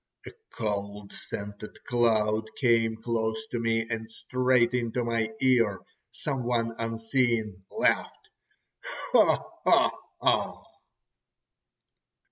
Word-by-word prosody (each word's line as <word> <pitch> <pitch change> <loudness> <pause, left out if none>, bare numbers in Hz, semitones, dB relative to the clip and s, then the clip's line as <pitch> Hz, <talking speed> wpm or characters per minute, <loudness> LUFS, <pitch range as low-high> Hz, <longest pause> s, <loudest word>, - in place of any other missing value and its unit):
A - - -8 0.2
cold 100 -1 -4
scented 105 +1 -7
cloud 110 -2 +1
came 115 -3 +3
close 110 -1 -1
to 120 - -1
me, 115 -1 +1
and 110 -1 -4
straight 125 +1 +1
into 120 0 0
my 115 -1 0
ear 115 -7 +3 0.3
some 135 -4 -3
one 115 -1 0
unseen 115 -3 0
laughed: - - 0 0.8
"Ho! - - +3 0.6
ho! - - +1
115 Hz, 95 wpm, -28 LUFS, 110-120 Hz, 0.8 s, came